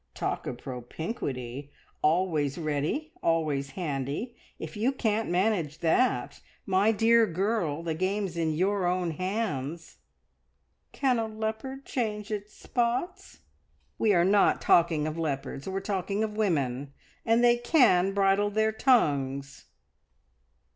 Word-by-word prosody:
Talk - - -3
of 120 - -4
propinquity! 130 - -5 0.3
Always 155 -3 +1
ready, 160 - -2
always 155 -4 0
handy, 150 - -3 0.2
if - - -7
you 225 +5 +1
can't 225 -4 -1
manage 175 -4 0
that! 170 +10 +1 0.2
My 195 +3 +3
dear 225 +1 +4
girl, 175 -4 -1
the 165 -1 -2
game's 190 +2 -1
in 165 -2 0
your 190 +3 +1
own 180 -1 0
hands." 170 - -3 0.9
"Can 255 -4 +1
a 225 - -1
leopard 220 +5 -5
change 215 -3 -3
its 210 0 -4
spots?" 255 - -3 0.6
"We're 200 -6 +4
not 200 +1 +4
talking 165 -3 +3
of 155 +1 -3
leopards; 140 0 -3
we're 190 0 -2
talking 200 +1 -2
of 215 -1 -3
women 140 - -1 0.3
and 230 +1 +3
they 240 0 +5
can 240 - +4
bridle 200 +1 +3
their 220 +1 +1
tongues!" 140 - +1
190 Hz, 120 wpm, -28 LUFS, 155-220 Hz, 0.9 s, they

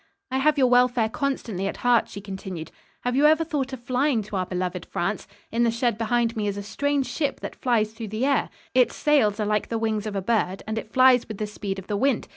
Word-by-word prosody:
"I 265 - +1
have 305 +2 +3
your 265 - +5
welfare 245 -2 +3
constantly 225 -7 -2
at - - -4
heart," 240 -2 +4
she 200 - -8
continued. 190 -4 -7 0.3
"Have 245 0 -1
you 290 +3 +5
ever 315 +1 +4
thought 285 -5 -2
of 260 -3 -7
flying 255 -1 +1
to 205 0 -7
our 185 -1 -1
beloved 180 -1 -3
France? 195 +4 -2 0.2
In 230 - 0
the 235 - +4
shed 235 0 0
behind 235 0 +1
me 210 -2 -1
is 200 0 -2
a 200 - -4
strange 285 +5 0
ship 285 -1 -2
that - - -7
flies 220 -4 +1
through 225 0 -6
the 215 +5 -1
air. 280 -1 +2 0.2
Its 250 -1 +3
sails 230 -9 +2
are 210 - 0
like 210 0 0
the 230 - -1
wings 220 -1 -1
of 210 - -4
a - - +1
bird, 195 -3 0
and 220 +1 -2
it 220 - -10
flies 255 -1 +5
with 215 - -6
the 215 - -2
speed 205 -2 -5
of 190 - -7
the 205 - -2
wind. 265 +1 +1
225 Hz, 250 wpm, -25 LUFS, 205-260 Hz, 0.3 s, your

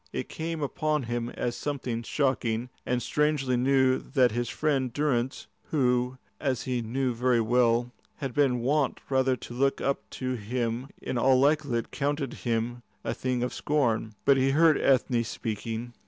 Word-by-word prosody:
It - - -4
came 160 -1 -3
upon 150 +1 0
him 120 0 -2
as 120 -1 -3
something 125 -4 -3
shocking 120 -3 0 0.2
and 125 -2 0
strangely 145 -1 +1
new 130 +1 +3
that 130 -4 +2
his 120 +1 -2
friend 135 -5 0
Durrance, 130 -2 -1 0.2
who, 125 -3 +1 0.2
as 130 -4 -1
he 125 -2 -1
knew 125 +3 -1
very 125 0 +2
well, 120 +1 +2 0.2
had 135 -4 -5
been 130 -4 +2
wont 140 +3 +1
rather 130 -1 +3
to 120 - -9
look 135 +3 +1
up 140 - 0 0.2
to 130 -1 -2
him, 120 +2 -2
in 125 - -2
all 130 +1 +4
likelihood 140 -4 +1
counted 145 -1 -1
him 120 0 -2 0.2
a - - -1
thing 125 -1 -1
of 125 - -2
scorn. 115 -7 0
But 140 - +6
he 135 +1 +3
heard 155 +2 +4
Ethne 125 -3 +3
speaking. 115 +1 -4
130 Hz, 160 wpm, -28 LUFS, 120-140 Hz, 0.2 s, But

